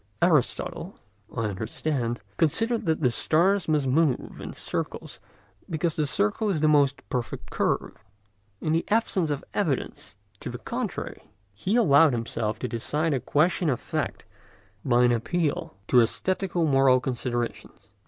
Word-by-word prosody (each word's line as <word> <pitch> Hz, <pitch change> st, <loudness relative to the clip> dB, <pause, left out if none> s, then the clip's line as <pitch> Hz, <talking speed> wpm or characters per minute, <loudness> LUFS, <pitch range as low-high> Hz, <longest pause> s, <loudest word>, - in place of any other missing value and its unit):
Aristotle, 170 Hz, +3 st, 0 dB, 0.3 s
I 115 Hz, -, -3 dB
understand, 115 Hz, +4 st, -2 dB, 0.2 s
considered 225 Hz, +7 st, +1 dB
that 160 Hz, 0 st, +1 dB
the 125 Hz, -4 st, +3 dB
stars 180 Hz, +9 st, +2 dB
must 150 Hz, -3 st, +2 dB
move 140 Hz, 0 st, +1 dB
in -, -, -6 dB
circles -, -, -5 dB, 0.5 s
because 165 Hz, -1 st, -1 dB
the 150 Hz, -2 st, 0 dB
circle 140 Hz, -, +1 dB
is 180 Hz, -6 st, 0 dB
the 155 Hz, -, +4 dB
most 145 Hz, -3 st, +3 dB
perfect 125 Hz, -4 st, -4 dB
curve. -, -, -1 dB, 0.6 s
In 155 Hz, -, 0 dB
the 165 Hz, -, +2 dB
absence 200 Hz, -6 st, +1 dB
of 145 Hz, -2 st, -2 dB
evidence 155 Hz, -, -2 dB, 0.2 s
to -, -, -5 dB
the -, -, -5 dB
contrary, -, -, -5 dB, 0.2 s
he 185 Hz, -, -1 dB
allowed 155 Hz, -, +5 dB
himself 115 Hz, -2 st, -2 dB
to 125 Hz, -, -3 dB
decide 150 Hz, +7 st, -1 dB
a 135 Hz, -, +1 dB
question 165 Hz, +5 st, +1 dB
of 125 Hz, -, 0 dB
fact -, -, -4 dB, 0.6 s
by 120 Hz, -2 st, +3 dB
an 120 Hz, -, +5 dB
appeal 160 Hz, -, -1 dB
to -, -, +4 dB
æsthetico 175 Hz, -, +1 dB
moral 135 Hz, -2 st, +5 dB
considerations. 120 Hz, -1 st, -4 dB
150 Hz, 145 wpm, -26 LUFS, 125-170 Hz, 0.6 s, allowed